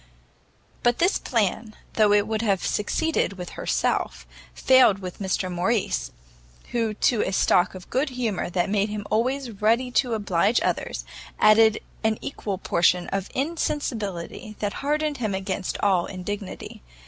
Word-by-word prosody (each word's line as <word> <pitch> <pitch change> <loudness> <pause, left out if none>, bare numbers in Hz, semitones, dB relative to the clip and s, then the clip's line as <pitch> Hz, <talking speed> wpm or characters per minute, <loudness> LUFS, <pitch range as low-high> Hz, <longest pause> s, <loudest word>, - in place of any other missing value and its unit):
But 240 0 +2
this 360 +4 +2
plan, 220 -1 -1 0.2
though 215 -2 +4
it 205 0 +4
would 220 0 -1
have 200 -5 0
succeeded 320 +4 0
with 180 -2 -7
herself, - - -1 0.3
failed 260 -6 +5
with 185 -2 -8
Mr 190 -1 -1
Morrice, 175 - 0 0.6
who 225 -3 0
to 230 +1 +2
a - - -1
stock 180 -1 +3
of 185 - -10
good 270 +4 +1
humour 240 -8 -2
that 175 0 0
made 205 +1 +1
him 210 -1 -5
always 235 -1 -1
ready 235 +4 +2
to 245 -2 +1
oblige 205 +1 +2
others, 165 - -2 0.3
added 220 0 +5 0.2
an 220 -1 +2
equal 205 -8 -4
portion 175 -1 +2
of 195 -1 -3
insensibility 230 - -3
that 205 -1 -2
hardened 300 +1 0
him 215 -5 -2
against 190 -1 -3
all 190 -4 +3
indignity. 195 +1 -6
210 Hz, 145 wpm, -24 LUFS, 190-240 Hz, 0.6 s, failed